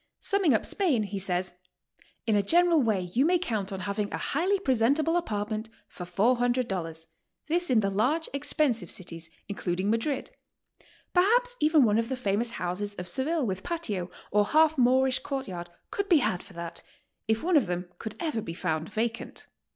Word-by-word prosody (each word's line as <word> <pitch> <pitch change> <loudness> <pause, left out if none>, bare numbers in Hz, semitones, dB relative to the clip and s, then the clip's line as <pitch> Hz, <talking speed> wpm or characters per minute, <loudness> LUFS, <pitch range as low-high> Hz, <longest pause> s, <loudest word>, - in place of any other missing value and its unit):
Summing 385 - +2
up - - 0
Spain, 310 - +2
he 200 -1 -4
says: 180 -1 -1 0.7
"In 220 -2 +2
a 205 - +4
general 340 - +4
way 215 -6 +1
you 255 - +3
may 355 +4 +4
count 220 - -2
on 190 -1 -4
having 205 +1 -2
a - - -2
highly 365 +8 +1
presentable 280 - +2
apartment 215 -8 -2 0.2
for 180 - -8
$400, 200 -6 0 0.2
— - - -51
this 350 +2 +1
in 240 -4 +4
the 195 - +1
large, 265 +12 +1
expensive 275 - 0
cities, 165 -2 -6 0.2
including 190 0 -1
Madrid. 255 +5 -1 0.8
Per 360 - +6
haps - - +3
even 305 -1 +5
one 215 -1 +3
of 230 +1 -1
the 260 - -2
famous 225 0 0
houses 205 0 -3
of 180 -2 -6
Seville 280 - 0
with 190 -3 -2
patio, 210 - -3 0.2
or 205 0 +4
half 315 0 +4
Moorish 260 0 +3
court 270 -2 -4
yard, 175 -2 -6 0.2
could 400 0 -2
be 345 - +7
had 180 -10 0
for - - -15
that 170 0 -7 0.2
— - - -52
if 220 0 +1
one 355 +1 +2
of 270 -10 +4
them 175 0 -3
could 220 - -6
ever 310 -10 -1
be 165 -4 -6
found 160 -3 -2
vacant. 230 +1 -3
230 Hz, 185 wpm, -28 LUFS, 195-300 Hz, 0.8 s, be